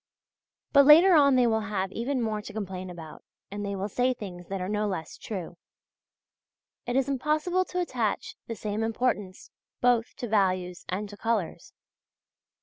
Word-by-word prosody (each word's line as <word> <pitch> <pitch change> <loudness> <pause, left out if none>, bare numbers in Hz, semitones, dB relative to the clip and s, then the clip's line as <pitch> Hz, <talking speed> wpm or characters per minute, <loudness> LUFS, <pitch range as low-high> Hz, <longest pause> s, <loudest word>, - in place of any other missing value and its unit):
But 280 -1 +7
later 335 +5 +9
on 280 -4 +6
they 250 -1 +4
will 220 -1 +2
have 195 -2 -2
even 245 +3 -2
more 215 -1 -2
to - - -10
complain 190 -3 -5
about, 165 -3 -10 0.3
and 205 +1 -4
they 200 0 -3
will 195 +1 -2
say 250 +5 +1
things 180 -5 -9
that 195 0 -4
are 180 - -3
no 210 +1 0
less 185 -5 -4
true. 185 -5 -6 1.3
It 245 - -1
is 270 0 +2
impossible 305 +7 0
to 360 - -4
attach 240 - -2
the 230 - -4
same 210 0 -3
importance 225 -4 -2 0.3
both 245 -2 +2
to 245 - -5
values 185 -4 0
and 200 +3 -2
to 205 - -11
colours. 220 -7 -2
215 Hz, 165 wpm, -27 LUFS, 190-255 Hz, 1.3 s, later